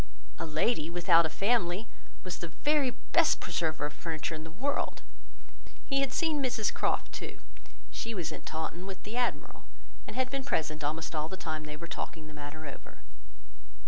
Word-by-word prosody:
A -, -, -2 dB
lady, 155 Hz, +2 st, +2 dB
without 170 Hz, -1 st, +6 dB
a -, -, -8 dB
family, 200 Hz, +2 st, +2 dB, 0.4 s
was 180 Hz, -1 st, -3 dB
the 170 Hz, -, -3 dB
very 290 Hz, -, +3 dB
best -, -, +3 dB
preserver 155 Hz, -3 st, 0 dB
of 150 Hz, -, -3 dB
furniture 165 Hz, -1 st, -2 dB
in 155 Hz, 0 st, -4 dB
the 160 Hz, -, -7 dB
world. 265 Hz, -, -1 dB, 0.8 s
He 275 Hz, -, +2 dB
had 275 Hz, -2 st, +2 dB
seen 315 Hz, -1 st, +2 dB
Mrs 245 Hz, -5 st, +2 dB
Croft, -, -, +1 dB
too; -, -, -5 dB, 0.5 s
she 230 Hz, 0 st, -3 dB
was 165 Hz, -4 st, -1 dB
at -, -, -7 dB
Taunton 165 Hz, +3 st, -3 dB
with 195 Hz, -1 st, -6 dB
the 210 Hz, +3 st, -5 dB
admiral, 245 Hz, -1 st, 0 dB, 0.4 s
and -, -, -6 dB
had 255 Hz, -1 st, +1 dB
been 275 Hz, -1 st, -1 dB
present 155 Hz, -, 0 dB
almost 160 Hz, +3 st, -1 dB
all 155 Hz, 0 st, 0 dB
the 190 Hz, -, -4 dB
time 155 Hz, -4 st, -3 dB
they 150 Hz, 0 st, -5 dB
were 170 Hz, -, -6 dB
talking 165 Hz, -1 st, -4 dB
the 155 Hz, -, -10 dB
matter 150 Hz, +1 st, -7 dB
over. 140 Hz, -, -9 dB
170 Hz, 180 wpm, -32 LUFS, 155-235 Hz, 0.8 s, without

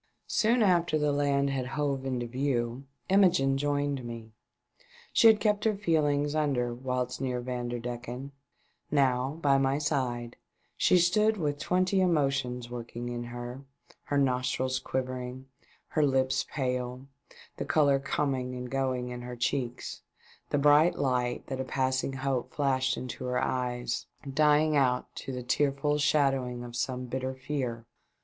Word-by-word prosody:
Soon 230 Hz, +2 st, +2 dB
after 175 Hz, -5 st, +3 dB
the 150 Hz, -1 st, +1 dB
land 140 Hz, -1 st, +1 dB
had 130 Hz, -2 st, -2 dB
hove 135 Hz, -1 st, -2 dB
into 125 Hz, -2 st, -2 dB
view, 125 Hz, 0 st, -1 dB, 0.2 s
Imogene 180 Hz, -8 st, +4 dB
joined 145 Hz, -1 st, -1 dB
me. 115 Hz, -1 st, -8 dB, 0.8 s
She 230 Hz, -, +7 dB
had 220 Hz, -1 st, +7 dB
kept 210 Hz, -1 st, +1 dB
her 220 Hz, -2 st, +2 dB
feelings 150 Hz, -6 st, +1 dB
under 135 Hz, -6 st, 0 dB
whilst 125 Hz, 0 st, -3 dB
near 125 Hz, -2 st, -1 dB
Vanderdecken, 120 Hz, +1 st, -5 dB, 0.6 s
Now, 135 Hz, 0 st, +1 dB
by 135 Hz, -1 st, +4 dB
my 135 Hz, 0 st, +2 dB
side, 130 Hz, -5 st, -2 dB, 0.4 s
she 180 Hz, -, +4 dB
stood 210 Hz, +5 st, +3 dB
with 145 Hz, -5 st, -1 dB
twenty 185 Hz, +4 st, +2 dB
emotions 135 Hz, -8 st, +1 dB
working 120 Hz, 0 st, -6 dB
in 120 Hz, 0 st, -4 dB
her, 120 Hz, +2 st, -7 dB, 0.4 s
her 145 Hz, -, 0 dB
nostrils 130 Hz, -1 st, +1 dB
quiver 130 Hz, -1 st, -3 dB
ing, 125 Hz, +1 st, -7 dB, 0.4 s
her 155 Hz, -, +1 dB
lips 130 Hz, -2 st, +1 dB
pale, 125 Hz, -1 st, -2 dB, 0.5 s
the -, -, -3 dB
colour 140 Hz, -3 st, +3 dB
coming 135 Hz, -2 st, -1 dB
and 125 Hz, 0 st, -6 dB
going 130 Hz, -2 st, -1 dB
in 125 Hz, 0 st, -6 dB
her 125 Hz, 0 st, -6 dB
cheeks, 120 Hz, 0 st, -2 dB, 0.5 s
the -, -, +1 dB
bright 150 Hz, +4 st, +5 dB
light 125 Hz, -3 st, 0 dB
that 130 Hz, -1 st, -4 dB
a -, -, -1 dB
passing 130 Hz, 0 st, -1 dB
hope 135 Hz, -1 st, -2 dB
flashed 130 Hz, -2 st, +1 dB
into 125 Hz, 0 st, -6 dB
her 125 Hz, 0 st, -1 dB
eyes 125 Hz, -1 st, -2 dB, 0.3 s
dying 150 Hz, +1 st, +4 dB
out 125 Hz, -3 st, +1 dB
to -, -, -5 dB
the 125 Hz, -1 st, -5 dB
tearful 145 Hz, +3 st, +1 dB
shadowins: 135 Hz, -4 st, +1 dB
of 120 Hz, -1 st, -9 dB
some 125 Hz, +1 st, -2 dB
bitter 130 Hz, +1 st, -3 dB
fear. 130 Hz, -4 st, -3 dB
130 Hz, 145 wpm, -29 LUFS, 125-145 Hz, 0.8 s, She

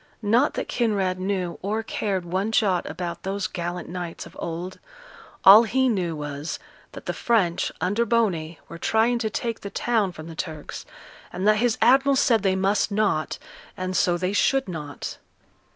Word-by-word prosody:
Not 235 Hz, +7 st, +3 dB
that -, -, -3 dB
Kinraid 200 Hz, -6 st, 0 dB
knew 185 Hz, -2 st, -2 dB
or 215 Hz, +3 st, -2 dB
cared 195 Hz, -4 st, -2 dB
one 190 Hz, +5 st, -1 dB
jot 195 Hz, -5 st, +1 dB
about 170 Hz, +1 st, -5 dB
those 195 Hz, 0 st, -3 dB
gallant 175 Hz, -1 st, -4 dB
knights 175 Hz, -1 st, -6 dB
of -, -, -14 dB
old: 175 Hz, +3 st, -5 dB, 0.7 s
all 200 Hz, +3 st, +11 dB
he 260 Hz, +3 st, +1 dB
knew 180 Hz, -7 st, -1 dB
was, 150 Hz, +1 st, -5 dB, 0.4 s
that -, -, -10 dB
the -, -, -2 dB
French, 195 Hz, -8 st, +1 dB
under 205 Hz, +7 st, +1 dB
Boney, 190 Hz, -9 st, 0 dB
were 170 Hz, -, -9 dB
trying 225 Hz, +5 st, +2 dB
to 220 Hz, -2 st, -1 dB
take 230 Hz, +1 st, -3 dB
the 200 Hz, -, -7 dB
town 220 Hz, -3 st, 0 dB
from 155 Hz, -3 st, -10 dB
the 165 Hz, -, -8 dB
Turks, 155 Hz, -2 st, -6 dB, 0.4 s
and 185 Hz, +3 st, -2 dB
that 215 Hz, 0 st, +5 dB
his 235 Hz, 0 st, +1 dB
admiral 270 Hz, +3 st, +5 dB
said 230 Hz, -4 st, +3 dB
they 190 Hz, -1 st, +2 dB
must 195 Hz, +3 st, +1 dB
not, 205 Hz, -7 st, 0 dB, 0.4 s
and 185 Hz, 0 st, -3 dB
so 175 Hz, -1 st, +2 dB
they 185 Hz, +2 st, -1 dB
should 270 Hz, +4 st, +2 dB
not. 150 Hz, -5 st, -6 dB
190 Hz, 170 wpm, -24 LUFS, 175-220 Hz, 0.7 s, all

